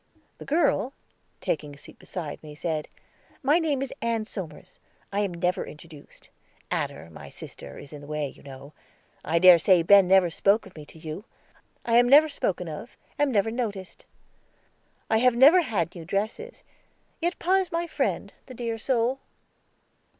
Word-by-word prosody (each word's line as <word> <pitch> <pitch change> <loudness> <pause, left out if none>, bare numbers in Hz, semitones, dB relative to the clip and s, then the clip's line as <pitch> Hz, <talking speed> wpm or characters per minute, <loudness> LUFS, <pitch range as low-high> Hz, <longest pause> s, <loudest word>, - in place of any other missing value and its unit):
The - - -9
girl, 275 - +1 0.5
taking 145 -2 -3
a - - -17
seat - - -14
beside 160 -5 -6
me, 150 -1 -11
said: 155 -1 -3 0.6
"My 295 +6 +4
name 295 -5 0
is 275 - -6
Ann 230 -2 -1
Somers. 185 -3 -9 0.3
I 200 - 0
am 200 -2 0
never 175 +1 -1
introduced; 150 -1 -14 0.4
Adder, 85 - -3
my - - -11
sister, - - -11
is 145 - -11
in 145 - -9
the 145 - -12
way, 150 -1 -2
you - - -14
know. 140 +1 -12 0.5
I 165 +2 0
dare 180 0 +8
say 180 0 +4
Ben 200 +1 +7
never 185 -2 +4
spoke 200 +5 +2
of 190 - -15
me 150 -2 -11
to - - -15
you. 160 +6 -7 0.6
I 230 0 +3
am 245 0 +5
never 300 +3 +7
spoken 185 - -2
of, 160 - -8 0.2
am 290 -2 +2
never 220 -1 +1
noticed. 205 -6 -5 1.0
I 220 - +2
have 250 0 +4
never 295 +9 +7
had 190 - -2
new 170 - -9
dresses; 215 - -4 0.6
yet 345 +2 -1
pa 375 +2 +2
is 375 -3 -1
my 335 +1 -1
friend, 320 - -2
the 255 - -10
dear 230 -1 -4
soul." 250 +2 0
200 Hz, 170 wpm, -26 LUFS, 165-255 Hz, 1.0 s, dare